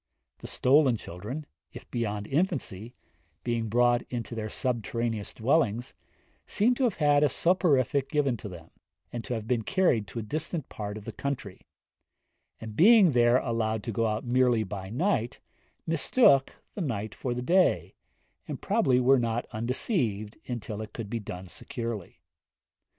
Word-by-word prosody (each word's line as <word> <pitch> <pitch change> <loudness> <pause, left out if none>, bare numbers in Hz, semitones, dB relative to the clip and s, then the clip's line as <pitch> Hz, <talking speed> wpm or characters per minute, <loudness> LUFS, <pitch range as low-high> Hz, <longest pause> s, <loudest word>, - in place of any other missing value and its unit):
The - - -8
stolen 135 -2 +3
children, 105 - -7 0.3
if - - -10
beyond 105 -4 -2
infancy, 130 - -2 0.5
being 115 -2 -1
brought 120 +2 +3
into 120 -1 -4
their 110 -2 -4
subterraneous 115 -3 -2
dwellings, 120 -2 +1 0.5
seem 230 +5 +3
to 255 +1 +1
have 230 - +1
had 145 -2 +3
a 150 - +4
soporific 140 -6 +2
given 140 -5 +1
them, 90 -6 -9 0.4
and 120 -1 -4
to 125 - -3
have 110 -1 -5
been 120 -2 +1
carried 130 - +1
to 95 - -9
a 115 - -2
distant 155 +5 -4
part 105 0 -5
of 105 - -10
the - - -5
country; 125 -9 -5 1.0
and, 110 -1 -8
being 205 - +7
there 120 -1 +4
allowed 110 -4 -1
to 115 - -3
go 115 +2 +1
out 110 +2 -2
merely 125 -2 +3
by 95 -1 -6
night, 125 - 0 0.5
mistook 160 - +3 0.2
the 205 - -5
night 110 - -3
for 125 -2 -3
the 125 - -3
day, 180 +6 +2 0.5
and - - -5
probably 200 - +2
were 130 +1 +5
not 115 0 -1
undeceived 115 - -1
until 110 -3 -4
it 110 - -8
could 110 -3 -6
be 115 - -1
done 95 -3 -7
securely. 115 0 -6
120 Hz, 155 wpm, -28 LUFS, 110-140 Hz, 1.0 s, being